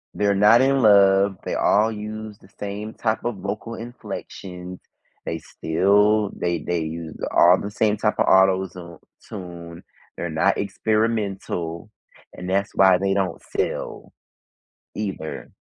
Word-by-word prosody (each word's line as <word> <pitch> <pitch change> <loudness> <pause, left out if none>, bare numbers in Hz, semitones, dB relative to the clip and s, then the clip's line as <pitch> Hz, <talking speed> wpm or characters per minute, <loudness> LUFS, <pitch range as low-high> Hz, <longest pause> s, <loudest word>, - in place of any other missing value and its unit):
They're 100 -1 +1
not 105 +5 +6
in 135 0 +3
love. 100 -2 +5
They - - -3
all 110 +2 +3
use 110 0 -7
the 95 - -21
same 105 +2 -5
type 110 0 -2
of 120 -4 -2
vocal 105 +4 -5
inflections. 90 -6 -8 0.5
They 80 - -3
still 100 +7 +2
they 85 -2 -1
they 85 +1 -2
use 80 0 -6 0.2
all 90 +2 +6
the 100 - -5
same 105 0 +1
type 105 - -1
of - - +4
auto 95 0 +4
zo 85 -2 -11 0.3
tune. 85 -4 -9 0.3
They're 85 - -3
not 80 +5 +1
experimental, 100 -5 -2 0.4
and 90 - -8
that's 100 +1 0
why 95 -2 +6
they 95 0 +1
don't 95 -2 -1
sell - - -4 0.8
either. 95 -7 -5
100 Hz, 140 wpm, -23 LUFS, 90-105 Hz, 0.8 s, not